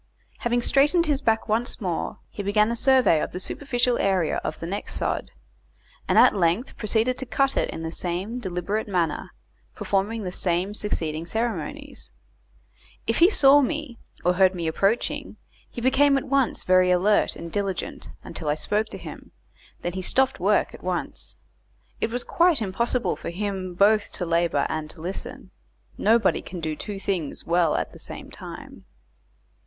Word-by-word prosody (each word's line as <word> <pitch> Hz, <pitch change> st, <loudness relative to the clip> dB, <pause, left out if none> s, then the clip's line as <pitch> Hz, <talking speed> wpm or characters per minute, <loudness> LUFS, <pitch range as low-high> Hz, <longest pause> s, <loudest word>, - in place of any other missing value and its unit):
Having 240 Hz, 0 st, 0 dB
straightened 295 Hz, +7 st, +4 dB
his 295 Hz, -3 st, 0 dB
back 225 Hz, -2 st, +1 dB
once 230 Hz, +3 st, 0 dB
more, 180 Hz, -6 st, -3 dB
he -, -, -5 dB
began 210 Hz, +2 st, +2 dB
a -, -, -1 dB
survey 255 Hz, -, +4 dB
of -, -, -4 dB
the 180 Hz, -, -4 dB
superficial 245 Hz, +3 st, -1 dB
area 190 Hz, -5 st, +1 dB
of -, -, -4 dB
the -, -, -5 dB
next 195 Hz, +4 st, -4 dB
sod, -, -, -2 dB, 0.8 s
and -, -, +2 dB
at -, -, +7 dB
length 180 Hz, +6 st, +1 dB
proceeded 225 Hz, +3 st, 0 dB
to 265 Hz, -, -4 dB
cut 270 Hz, +4 st, +1 dB
it -, -, +1 dB
in 165 Hz, -, -6 dB
the 160 Hz, -, -4 dB
same 185 Hz, +8 st, -3 dB
deliberate 195 Hz, +2 st, -3 dB
manner, 175 Hz, -6 st, -1 dB, 0.5 s
performing 205 Hz, +3 st, -1 dB
the 180 Hz, -, -3 dB
same 180 Hz, +2 st, -1 dB
succeeding 165 Hz, -6 st, -3 dB
ceremonies. 220 Hz, -6 st, -4 dB, 1.0 s
If 225 Hz, -, 0 dB
he 345 Hz, +2 st, +7 dB
saw 285 Hz, -7 st, +6 dB
me, 290 Hz, -3 st, -3 dB, 0.3 s
or 180 Hz, -, +4 dB
heard 190 Hz, 0 st, +4 dB
me 170 Hz, -2 st, -3 dB
approaching, 195 Hz, +8 st, 0 dB, 0.3 s
he 240 Hz, -, -7 dB
became 275 Hz, +3 st, +4 dB
at -, -, -2 dB
once 275 Hz, -2 st, +1 dB
very 185 Hz, 0 st, +4 dB
alert 185 Hz, +4 st, +3 dB
and 170 Hz, 0 st, -8 dB
diligent 195 Hz, -3 st, -3 dB
until 155 Hz, -, -5 dB
I 150 Hz, -, +2 dB
spoke 210 Hz, +7 st, 0 dB
to -, -, -7 dB
him, -, -, -10 dB, 0.5 s
then 175 Hz, -, -2 dB
he 190 Hz, -, -3 dB
stopped 265 Hz, +8 st, +1 dB
work -, -, +2 dB
at -, -, -12 dB
once. -, -, -3 dB, 0.6 s
It -, -, 0 dB
was 245 Hz, +1 st, 0 dB
quite 340 Hz, -3 st, +3 dB
impossible 235 Hz, +4 st, 0 dB
for -, -, -6 dB
him 190 Hz, 0 st, -4 dB
both 205 Hz, +3 st, +3 dB
to 180 Hz, -, -3 dB
labour 170 Hz, -3 st, +1 dB
and 155 Hz, -1 st, -4 dB
to 170 Hz, -, -12 dB
listen; 180 Hz, +4 st, -6 dB, 0.4 s
nobody 225 Hz, +2 st, +3 dB
can 180 Hz, -, -8 dB
do 160 Hz, -1 st, -3 dB
two 205 Hz, +5 st, -6 dB
things 180 Hz, -8 st, -2 dB
well 170 Hz, -2 st, +2 dB
at -, -, -2 dB
the -, -, -13 dB
same -, -, -9 dB
time. -, -, -10 dB
205 Hz, 170 wpm, -25 LUFS, 175-240 Hz, 1.0 s, at